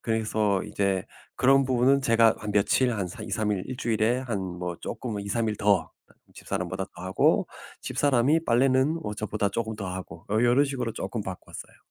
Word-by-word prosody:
그래서 110 Hz, -3 st, 0 dB
이제 95 Hz, -2 st, -1 dB, 0.3 s
그런 135 Hz, +1 st, +4 dB
부분은 130 Hz, +2 st, +3 dB
제가 115 Hz, -3 st, +4 dB
한 105 Hz, -1 st, -5 dB
며칠 105 Hz, +5 st, +3 dB
한 100 Hz, -4 st, -2 dB
사 90 Hz, -, -9 dB
2-3 105 Hz, +1 st, -1 dB
일 95 Hz, -2 st, -2 dB
1 130 Hz, -, -5 dB
주일에 115 Hz, +1 st, +1 dB
한 120 Hz, -6 st, -3 dB
뭐 90 Hz, -2 st, -5 dB
쪼끔은 110 Hz, -5 st, -4 dB
2-3 110 Hz, +3 st, -1 dB
일 105 Hz, -, -4 dB
더 100 Hz, -4 st, +2 dB, 0.4 s
집사람보다 95 Hz, +1 st, -4 dB
더 90 Hz, -, -9 dB
하고 95 Hz, 0 st, +2 dB, 0.4 s
집사람이 145 Hz, +4 st, +2 dB
빨래는 130 Hz, +4 st, +3 dB
뭐 105 Hz, -, -4 dB
저보다 105 Hz, -1 st, -2 dB
쪼금 110 Hz, +1 st, -3 dB
더 100 Hz, -3 st, -5 dB
하고 90 Hz, -3 st, -8 dB
요 110 Hz, +2 st, +3 dB
요런 125 Hz, +4 st, +4 dB
식으로 130 Hz, -5 st, -3 dB
쪼끔 115 Hz, 0 st, -4 dB
바꿨어요. 95 Hz, -2 st, -9 dB
110 Hz, 325 characters per minute, -26 LUFS, 100-125 Hz, 0.4 s, 그런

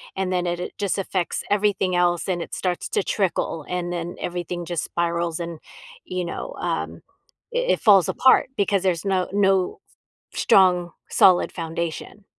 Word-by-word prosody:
And 190 Hz, -1 st, -2 dB
then 180 Hz, -1 st, 0 dB
it 175 Hz, +1 st, -3 dB
just 200 Hz, -1 st, -1 dB
affects 185 Hz, -2 st, -2 dB
everything 195 Hz, -3 st, +1 dB
else, 175 Hz, -1 st, +1 dB
and 175 Hz, -2 st, -1 dB
it -, -, -7 dB
starts 180 Hz, -2 st, -2 dB
to -, -, 0 dB
trickle, 170 Hz, -5 st, -1 dB
and 180 Hz, -1 st, -2 dB
then, 175 Hz, 0 st, -4 dB
everything 175 Hz, 0 st, -4 dB
just 170 Hz, -2 st, -2 dB
spirals 170 Hz, -1 st, -1 dB
and, 170 Hz, -2 st, -6 dB, 0.5 s
you 180 Hz, -1 st, -3 dB
know, -, -, -5 dB
um, -, -, -3 dB, 0.5 s
i -, -, 0 dB, 0.2 s
it -, -, -2 dB
falls 195 Hz, -5 st, +6 dB
apart 260 Hz, -1 st, +4 dB
because 200 Hz, -1 st, +1 dB
there's 180 Hz, -1 st, 0 dB
no 190 Hz, -2 st, +1 dB
no 195 Hz, -2 st, +2 dB, 0.5 s
strong, 180 Hz, -2 st, +3 dB, 0.2 s
solid 185 Hz, -2 st, +5 dB
foundation. 170 Hz, +4 st, -5 dB
180 Hz, 155 wpm, -23 LUFS, 170-195 Hz, 0.5 s, falls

